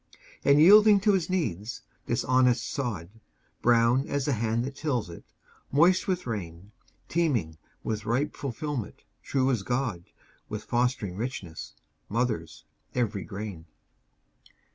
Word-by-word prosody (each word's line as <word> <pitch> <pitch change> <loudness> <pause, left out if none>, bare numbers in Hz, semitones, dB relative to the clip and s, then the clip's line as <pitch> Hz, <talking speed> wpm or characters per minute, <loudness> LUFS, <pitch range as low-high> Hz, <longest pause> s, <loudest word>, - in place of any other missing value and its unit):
And 140 +1 +5
yielding 205 +5 +8
to 210 0 +4
his 185 -3 0
needs, 120 - -2 0.2
this 120 +2 0
honest 125 -1 +3
sod, 105 - -4 0.5
Brown 120 +3 +3
as 140 -2 -1
the 145 - +1
hand 115 +1 0
that 135 +1 -6
tills 125 - -2
it, 85 - -11 0.5
moist 170 +6 +4
with 185 -2 -1
rain, 95 -4 -6 0.4
Teeming 120 - 0 0.2
with 110 -1 -3
ripe 135 +6 0
fulfilment, 140 -2 -5 0.2
true 135 -1 +1
as 120 -6 0
God, 115 -6 -2 0.4
With 105 0 -5
fostering 120 -6 -1
richness, 100 -8 -6 0.3
mothers 85 -10 -2 0.3
every 110 -5 -1
grain. 100 -5 -7
120 Hz, 125 wpm, -27 LUFS, 105-140 Hz, 0.5 s, yielding